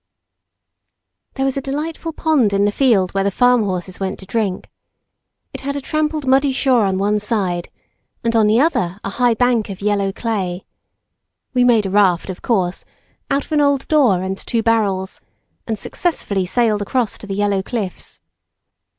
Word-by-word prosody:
There 270 - 0
was 270 0 -1
a - - -1
delightful 310 +4 -4
pond 300 -10 +1
in 200 +1 +3
the 205 - +2
field 205 -7 +2
where 195 0 0
the 200 - +2
farm 245 +4 +3
horses 185 -1 -4
went 195 0 -3
to 190 - -12
drink. 195 -2 -2 0.9
It - - -6
had 280 +1 -3
a - - -1
trampled 305 +1 -1
muddy 270 +1 +3
shore 260 -4 +2
on 190 -1 0
one 205 +2 +1
side, 195 -5 -2 0.5
and 230 0 0
on 220 -2 +4
the 220 +3 +4
other 200 - +1
a - - -3
high 240 +2 +2
bank 240 -2 +1
of 195 -1 -7
yellow 200 -1 0
clay. 195 -5 -3 0.9
We 250 -1 +3
made 235 -4 +4
a 190 - -2
raft, 190 -3 +2
of 180 - -10
course, 190 -6 0 0.5
out 275 0 0
of - - -22
an 300 -1 +3
old 285 -2 +1
door 245 - +3
and 190 +1 -3
two 230 -1 -2
barrels, 200 -5 0 0.5
and 220 -2 -2
successfully 200 - -2
sailed 220 0 +1
across 230 +1 -1
to 210 - -10
the 195 - -3
yellow 205 -1 +1
cliffs. 200 -2 -5
215 Hz, 175 wpm, -19 LUFS, 195-260 Hz, 0.9 s, on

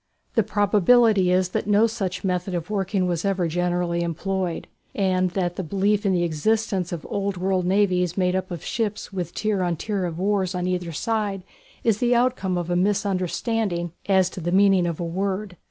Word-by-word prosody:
The 225 - +4
probability 205 0 +4
is 185 0 +2
that 185 - -2
no 210 +2 +5
such 200 -5 -3
method 180 0 -1
of 175 +4 -4
working 195 -2 0
was 175 -2 -1
ever 195 -3 0
generally 175 0 0
employed, 175 +1 -2 0.3
and 185 -2 +1
that 175 -2 -1
the 190 - -2
belief 200 +4 +1
in - - +3
the 175 -2 +2
existence 185 +3 0
of 170 -3 -5
old 200 -1 -2
world 185 0 0
navies 185 -2 +2
made 180 -1 +2
up 185 0 -2
of 175 -3 -6
ships 215 -3 -3
with 175 -3 -3
tier 215 -3 0
on 175 -2 0
tier 195 +2 -2
of 170 -1 -4
oars 195 -1 0
on 180 0 -2
either 180 -2 -2
side 205 +2 -2 0.4
is 220 -3 +2
the 245 0 +3
outcome 240 -7 +1
of 175 0 -3
a - - +2
misunderstanding 190 -1 0 0.2
as 190 -2 +4
to 185 - -7
the 175 +2 -2
meaning 190 -2 +4
of 170 -2 -3
a - - -2
word. 190 +2 -3
185 Hz, 190 wpm, -24 LUFS, 175-205 Hz, 0.4 s, no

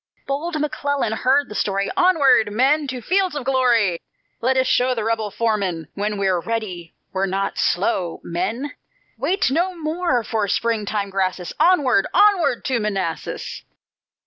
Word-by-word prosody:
Bold 310 +4 -2
McClellan 285 -4 -1
heard 270 +5 +2
the - - -9
story: 200 -1 -1
"Onward, 280 - +4
men, 275 +7 +2
to 255 -2 -5
fields 375 - +1
of 290 - -3
glory; 240 -9 +2 0.4
Let 260 +3 +2
us 260 - +3
show 255 0 +2
the 225 - -2
rebel 225 -1 -1
foemen, 200 -7 -1
When 210 +1 -2
we're 190 -3 +1
READY 185 -5 -4 0.2
we're 195 +1 0
not 195 +1 -2
slow, 180 -2 0
men; 215 +12 -3 0.5
Wait 385 -7 +1
no 355 +5 0
more 310 -5 0
for 220 -2 -1
springing 210 -2 -1
grasses 185 -2 -2
Onward! 285 - +4
onward! 350 - +3
to 255 -3 +1
Manassas!" 195 -6 -3
230 Hz, 145 wpm, -21 LUFS, 195-285 Hz, 0.5 s, Onward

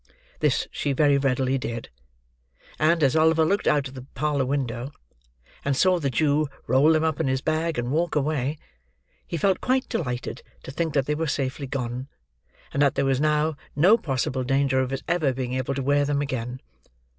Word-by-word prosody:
This - - +1
she 140 - -1
very 140 0 +3
readily 135 0 +1
did; 115 -2 -5 0.9
and, 160 +1 +3
as 135 0 +3
Oliver 160 0 +4
looked 200 +5 0
out 145 -2 +2
of 130 - -12
the 130 -1 -10
parlour 145 -3 0
window, 130 -2 -2 0.7
and 140 -1 0
saw 185 +2 +4
the 140 -4 -1
Jew 150 +3 +2 0.2
roll 140 +6 +4
them 155 0 +2
up 160 -2 0
in 160 - 0
his 130 0 0
bag 160 +1 -1
and 120 +1 -2
walk 165 +3 0
away, 150 -1 0 0.7
he 170 - -3
felt 190 +4 +1
quite 260 +1 +1
delighted 125 -5 -3 0.2
to - - -7
think 160 +1 -2
that 135 -2 +2
they 150 - 0
were 160 +2 -2
safely 140 0 -2
gone, 125 0 -4 0.7
and 140 - 0
that 140 -2 +3
there - - +1
was 135 0 +1
now 150 0 +2 0.2
no 175 +10 +6
possible 130 - -2
danger 135 0 +2
of 130 -1 0
his 135 0 -4
ever 155 -6 +1
being 125 -1 -3
able 130 +1 -2
to 135 - -2
wear 145 +2 +3
them 145 0 0
again. 130 -2 -4
140 Hz, 190 wpm, -25 LUFS, 130-155 Hz, 0.9 s, no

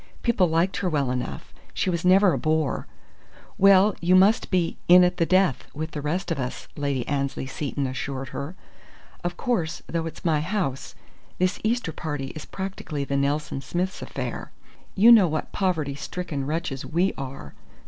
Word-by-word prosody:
People 220 -7 +3
liked 165 +4 +1
her 180 -1 0
well 140 -5 0
enough: 125 -1 -5 0.2
she 185 - 0
was 170 +1 -2
never 185 +1 +5
a - - 0
bore. 155 -2 0 0.7
"Well, 195 +1 +6
you 175 +2 +4
must 200 +6 +4
be 180 -3 0
'in 180 +1 +8
at 180 0 +1
the 165 -2 +1
death,' 185 -7 +2
with 155 +2 -4
the 150 - -5
rest 175 +5 -2
of 160 - -1
us," 125 -1 -5
Lady 140 -4 -2
Annesley 140 -2 -2
Seton 140 +1 -3
assured 135 +1 -4
her. 150 +6 -6 0.7
"Of 175 0 -3
course, 195 -11 -1
though 165 -1 -2
it's 165 - -10
my 160 -3 +3
house, 170 -6 -3 0.4
this 185 +1 0
Easter 225 -5 0
party 145 -5 -4
is 155 - -8
practically 190 -7 -5
the 140 0 -2
Nelson 140 0 -1
Smiths' 180 +7 -3
affair. - - -5 0.4
You 220 +5 +7
know 215 -6 +8
what 155 -1 -3
poverty 160 -7 0
stricken 145 -2 -4
wretches 150 -4 -3
we 175 +4 +1
are! 130 - -7
165 Hz, 170 wpm, -25 LUFS, 140-185 Hz, 0.7 s, in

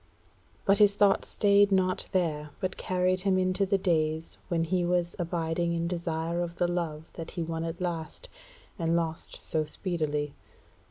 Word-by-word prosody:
But 200 0 +4
his 205 -1 +6
thought 205 -1 +4
stayed 200 0 +4
not 185 -1 +2
there, 155 -5 0
but 185 -1 -2
carried 185 0 0
him 190 -1 +2
into 185 +1 +1
the 195 0 +3
days 160 -3 0
when 170 -2 +1
he 180 +2 +1
was 175 0 0
abiding 170 0 -1
in 170 0 -1
desire 170 -1 -2
of 170 -1 -3
the 175 - +1
love 165 -3 -3
that 165 - -7
he 170 - 0
won 165 0 -3
at 165 +1 -4
last, 175 - -4 0.5
and 165 0 +1
lost 165 -1 -3
so 155 -1 +1
speedily. 150 -3 -2
170 Hz, 165 wpm, -29 LUFS, 165-185 Hz, 0.5 s, his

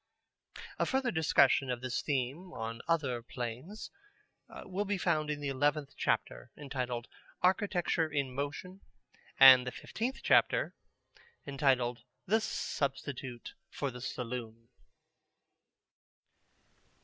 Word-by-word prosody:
A - - +2
further 265 -2 +1
discussion 160 -5 +3
of 125 -1 -2
this 130 -1 -2
theme 145 +6 -2
on 115 0 -5
other 140 -8 0
planes 125 - -6 0.7
will 190 +2 -2
be 205 0 -1
found 155 -4 0
in 150 -1 -3
the 145 - -2
eleventh 145 +1 0
chapter, - - -1
entitled 125 -4 -4 0.4
"Architecture 180 -4 +2
in 140 -3 -1
Motion," 145 +8 -5 0.6
and 130 -2 +10
the - - -2
fifteenth 245 - -4
chapter, - - +3 0.7
entitled 135 -4 +1 0.3
"The 220 +4 +2
Substitute 135 - -4 0.2
for 140 -2 -3
the 125 0 -9
Saloon." 115 -2 -6
140 Hz, 105 wpm, -32 LUFS, 125-170 Hz, 0.7 s, and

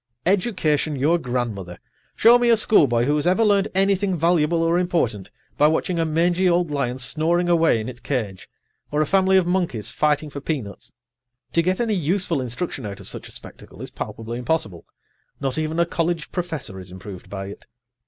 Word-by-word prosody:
Education 175 -6 +1
your 155 +6 +2
grandmother! 115 - -3 0.4
Show 240 +2 +6
me 240 -1 +2
a 230 - +5
schoolboy 140 - +3
who 145 +4 +1
has 150 - 0
ever 185 +5 +3
learned 200 -1 +3
anything 195 0 +2
valuable 165 0 +2
or 165 +1 +2
important 160 - -1 0.3
by 150 - +6
watching 165 +2 0
a 165 - +2
mangy 175 +3 +2
old 175 -2 +1
lion 130 -3 -1
snoring 165 +6 +1
away 165 -8 +3
in 110 - -5
its 125 -2 -7
cage 120 -7 -4 0.4
or 150 +1 +1
a - - +2
family 190 +3 +3
of 185 - +3
monkeys 175 - -1
fighting 150 0 0
for 140 - -7
peanuts. 130 - -5 0.6
To 170 - +4
get 185 +2 0
any 230 -3 +1
useful 175 -3 0
instruction 130 +3 -4
out 100 -2 -6
of - - -8
such - - -5
a - - -10
spectacle - - -11
is - - -7
palpably 115 +2 -6
impossible; 120 - -2 0.5
not 135 +1 -2
even 155 +1 -2
a 170 - +4
college 170 -1 -2
professor 160 - -4
is 90 -1 -10
improved 95 0 -10
by 95 -1 -6
it. 100 - -12
160 Hz, 185 wpm, -22 LUFS, 125-180 Hz, 0.6 s, Show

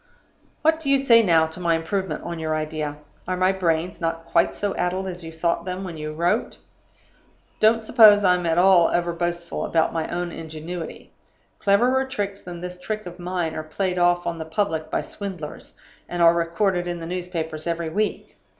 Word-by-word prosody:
"What 320 +1 +3
do 300 -4 -3
you 275 - +5
say 240 -4 +6
now 165 -6 +4
to 160 +3 -8
my 170 -2 +2
improvement 165 0 -2
on 170 -1 -5
your 155 -1 -1
idea? 155 -1 -3 0.3
Are 185 - -1
my 185 +1 +3
brains 175 -2 -1
not 165 0 -2
quite 170 0 +2
so 200 -1 -2
addled 185 +2 -1
as 180 -2 -6
you 165 - -7
thought 170 +1 -1
them 185 +1 -4
when 180 -3 -6
you 155 0 -5
wrote? 175 +8 0 1.0
Don't 220 +1 +4
suppose 215 -3 +7
I'm 180 -2 +3
at 165 0 +1
all 180 -2 +6
overboastful 175 0 -2
about 165 -1 +1
my 165 -1 -1
own 175 0 -3
ingenuity. 160 +2 -7 0.5
Cleverer 245 +7 +3
tricks 200 -6 -4
than 175 -1 -8
this 180 0 -7
trick 215 0 -4
of 175 0 -9
mine 175 -2 -2
are 155 - -3
played 180 +4 -2
off 175 0 +3
on 170 -1 -3
the 160 - -4
public 160 -2 -1
by - - -1
swindlers, 185 -7 -8 0.3
and 175 - -4
are 165 0 +7
recorded 175 +2 0
in 175 -1 -3
the 165 - -6
newspapers 170 -3 -4
every 170 -1 -2
week. 210 +5 -2
175 Hz, 185 wpm, -23 LUFS, 165-190 Hz, 1.0 s, suppose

